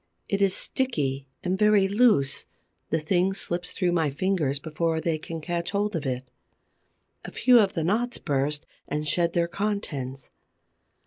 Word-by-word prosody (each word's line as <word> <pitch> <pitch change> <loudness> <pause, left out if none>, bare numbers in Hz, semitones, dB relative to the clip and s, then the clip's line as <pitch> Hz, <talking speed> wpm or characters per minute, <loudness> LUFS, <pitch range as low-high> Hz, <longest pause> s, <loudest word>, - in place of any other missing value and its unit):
It 200 0 -1
is 195 -1 +3
sticky 140 - -1 0.2
and 185 +1 -1
very 210 -2 +5
loose; 200 - +3 0.4
the 160 - +2
thing 180 +4 +1
slips 175 -2 -3
through 180 -2 0
my 165 -3 +2
fingers 150 -2 0
before 160 +2 -1
they 160 0 -1
can 165 +1 -6
catch 170 +1 -2
hold 205 0 -1
of 150 -4 -2
it. 130 0 -3 1.0
A - - -8
few 250 -2 +5
of 200 -3 +3
the 165 - -1
knots 230 +8 0
burst 145 +1 -1 0.2
and 150 +1 -2
shed 170 +2 +2
their 170 -1 +2
contents. 165 - -3
170 Hz, 155 wpm, -26 LUFS, 150-200 Hz, 1.0 s, very